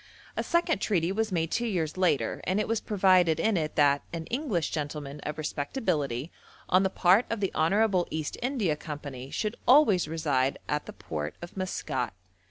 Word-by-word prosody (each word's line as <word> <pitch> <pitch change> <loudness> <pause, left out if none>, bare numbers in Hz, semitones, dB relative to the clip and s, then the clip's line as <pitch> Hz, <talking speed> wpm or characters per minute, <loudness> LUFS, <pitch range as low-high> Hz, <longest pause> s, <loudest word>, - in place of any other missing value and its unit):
A - - 0
second 340 -1 +1
treaty 180 -4 +1
was 220 +1 -1
made 165 -2 0
two 240 0 0
years 165 -7 -1
later, 160 -11 +1
and 185 +3 +1
it 210 - 0
was 225 -1 0
provided 185 -5 +3
in 220 +4 +2
it 155 -3 -1
that 145 -1 +4
'an 165 -2 -5
English 235 - -1
gentleman 150 -1 -4
of 150 +1 -5
respectability 150 - -2 0.4
on 185 - +4
the 190 - +2
part 190 +5 +4
of 230 - -2
the 195 -2 -1
Honourable 190 +2 +2
East 155 -1 -3
India 240 - 0
Company, 145 -4 -7
should 215 +8 -2
always 235 - +6
reside 145 -5 0
at 150 0 -2
the - - -7
port 75 -1 -5
of 175 - -9
Maskat.' 135 - -3
170 Hz, 180 wpm, -28 LUFS, 150-205 Hz, 0.4 s, always